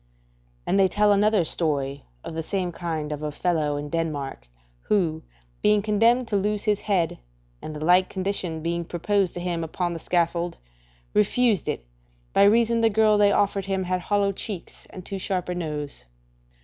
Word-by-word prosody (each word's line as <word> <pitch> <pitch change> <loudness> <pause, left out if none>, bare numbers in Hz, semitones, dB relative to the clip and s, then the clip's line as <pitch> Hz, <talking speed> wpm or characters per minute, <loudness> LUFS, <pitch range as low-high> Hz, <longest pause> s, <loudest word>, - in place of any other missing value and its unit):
And 195 - +2
they 190 - +6
tell 210 +2 +3
another 205 -2 +3
story 140 -4 -1 0.2
of - - -7
the 160 - -2
same 180 +1 -2
kind 160 -3 -4
of 150 0 -4
a 150 -1 -3
fellow 150 -2 0
in 145 0 -4
Denmark, 145 - -3 0.4
who 165 -6 +1 0.4
being 210 -1 +3
condemned 230 +4 +3
to 205 - 0
lose 205 +1 0
his 210 -2 +1
head, 185 - 0 0.4
and 155 - -7
the 150 +1 -4
like 180 +2 +5
condition 185 -4 -3
being 170 +1 -1
proposed 180 +2 0
to - - -3
him 175 -1 -2
upon 175 +2 -2
the 165 - -5
scaffold, 170 0 0 0.6
refused 215 - +2
it, - - -3 0.5
by 200 - +6
reason 230 +2 +4
the 225 - +4
girl 215 0 +3
they 205 -1 +5
offered 200 -1 +1
him 190 -1 -1
had 185 0 -1
hollow 200 +1 +1
cheeks 195 -2 -6
and 185 -1 -10
too 195 - -4
sharp 185 -1 -2
a - - 0
nose. 150 - -5
180 Hz, 175 wpm, -25 LUFS, 160-205 Hz, 0.6 s, they